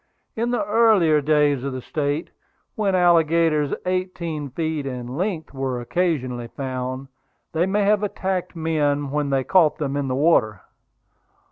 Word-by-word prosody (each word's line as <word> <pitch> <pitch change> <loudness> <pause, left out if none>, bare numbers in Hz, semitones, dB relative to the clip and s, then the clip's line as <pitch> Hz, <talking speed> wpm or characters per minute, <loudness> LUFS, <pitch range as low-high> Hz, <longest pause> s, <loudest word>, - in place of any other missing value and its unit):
In 235 +2 -1
the 240 -4 0
earlier 205 -8 +4
days 145 -2 +2
of 140 -1 -3
the 130 - -5
State, 145 +1 -2 0.4
when 200 -3 0
alligators 165 -4 +3
eighteen 175 -5 -3
feet 155 0 -3
in 125 -1 -5
length 175 -3 -3
were 135 -2 -2
occasionally 130 -4 -1
found, 130 +1 -5 0.5
they 165 +3 +1
may 205 +2 +1
have 205 0 +3
attacked 190 -3 -3
men 145 -3 0
when 145 -1 -1
they 135 -1 +1
caught 170 0 +3
them 140 -2 -2
in 140 -1 -1
the 130 - -1
water. 130 - +2
155 Hz, 145 wpm, -22 LUFS, 135-180 Hz, 0.5 s, earlier